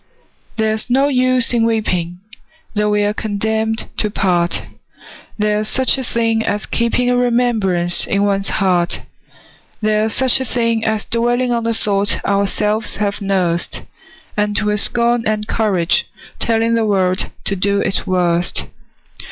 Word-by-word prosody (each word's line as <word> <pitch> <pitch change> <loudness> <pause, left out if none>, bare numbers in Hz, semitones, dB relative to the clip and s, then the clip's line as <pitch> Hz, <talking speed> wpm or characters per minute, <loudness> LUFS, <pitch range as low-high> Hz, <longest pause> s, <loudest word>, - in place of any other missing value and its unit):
There's 220 0 -1
no 270 +3 +3
use 255 -2 +2
in 235 -1 +2
weeping, 180 -6 -1 0.5
Though 210 -1 +1
we 210 0 +1
are 205 0 0
condemned 220 +1 -2
to 210 - 0
part: 175 -4 0 0.7
There's 210 0 0
such 260 -1 +3
a - - -3
thing 230 -2 0
as 210 -1 -2
keeping 235 +1 0
A - - +2
remembrance 230 -8 +1
in 200 0 +1
one's 195 -1 +1
heart: 180 -4 +1 0.8
There's 215 0 +1
such 260 0 +4
a - - -1
thing 230 -2 0
as 220 -2 -1
dwelling 240 +2 0
On 235 -1 0
the 230 0 +1
thought 205 -1 +2
ourselves 210 +2 0
have 205 0 -2
nursed, 185 -4 -1 0.5
And 210 0 0
with 210 0 0
scorn 235 0 +2
and 215 0 -1
courage 190 -6 +1 0.3
telling 230 0 +1
The 230 -1 +1
world 185 -2 +1
to 195 - -1
do 200 +2 +1
its 195 - 0
worst. 175 -1 0
215 Hz, 145 wpm, -17 LUFS, 200-230 Hz, 0.8 s, such